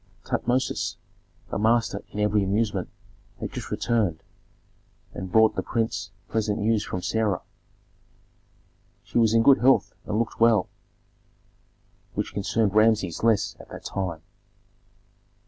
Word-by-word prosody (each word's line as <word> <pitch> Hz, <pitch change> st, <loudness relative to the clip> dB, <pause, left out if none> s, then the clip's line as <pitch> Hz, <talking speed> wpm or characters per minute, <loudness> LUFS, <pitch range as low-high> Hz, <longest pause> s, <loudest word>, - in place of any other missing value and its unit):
Tutmosis, 125 Hz, +2 st, -1 dB, 0.6 s
a -, -, -2 dB
master 110 Hz, -1 st, +2 dB
in 105 Hz, -, -7 dB
every 105 Hz, -1 st, +2 dB
amusement, 100 Hz, -1 st, 0 dB, 0.5 s
had -, -, -5 dB
just -, -, -6 dB
returned, 105 Hz, -9 st, 0 dB, 0.9 s
and 95 Hz, 0 st, -6 dB
brought 110 Hz, 0 st, +5 dB
the -, -, 0 dB
prince 110 Hz, -3 st, -2 dB, 0.2 s
pleasant 105 Hz, -2 st, -1 dB
news 110 Hz, 0 st, +1 dB
from 90 Hz, -3 st, -5 dB
Sarah. 110 Hz, -5 st, 0 dB, 1.6 s
She -, -, -1 dB
was 115 Hz, -1 st, +4 dB
in 115 Hz, -, +5 dB
good 135 Hz, +2 st, +6 dB
health 130 Hz, +2 st, +3 dB
and 105 Hz, -, -1 dB
looked 115 Hz, +1 st, -2 dB
well, 115 Hz, -4 st, +4 dB, 1.5 s
which -, -, -3 dB
concerned 105 Hz, 0 st, 0 dB
Rameses 110 Hz, -5 st, +3 dB
less 115 Hz, -3 st, +2 dB
at -, -, -13 dB
that -, -, -10 dB
time. 90 Hz, -5 st, -4 dB
110 Hz, 125 wpm, -25 LUFS, 100-115 Hz, 1.6 s, good